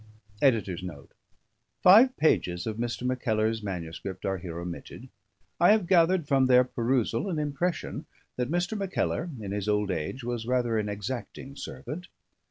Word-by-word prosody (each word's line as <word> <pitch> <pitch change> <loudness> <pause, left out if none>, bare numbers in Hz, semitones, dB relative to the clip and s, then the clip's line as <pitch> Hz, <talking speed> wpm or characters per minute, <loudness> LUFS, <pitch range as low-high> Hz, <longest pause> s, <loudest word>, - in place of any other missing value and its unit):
[EDITOR'S 110 -9 +2
NOTE. 80 -7 -9 0.7
_Five 240 +8 +8
pages 90 - +1
of 110 -1 -3
Mr. 120 +1 -3
Mackellar's 115 -3 0
MS. 85 -5 -5 0.2
are 95 -1 -1
here 85 -1 -7
omitted. 85 0 -8 0.5
I 175 +5 +7
have 215 -4 +1
gathered 170 -2 +3
from 135 -3 +3
their 125 0 +6
perusal 120 - 0
an 170 - -2
impression 150 +2 -2 0.3
that 125 0 -2
Mr. 175 +6 0
Mackellar, 190 -3 -1
in 100 -3 -5
his 105 0 -2
old 105 -1 +1
age, 90 +10 -4
was 120 -1 -3
rather 120 -3 +1
an 105 -1 -2
exacting 120 +6 -6
servant. 175 +4 -7
120 Hz, 150 wpm, -28 LUFS, 105-155 Hz, 0.7 s, Five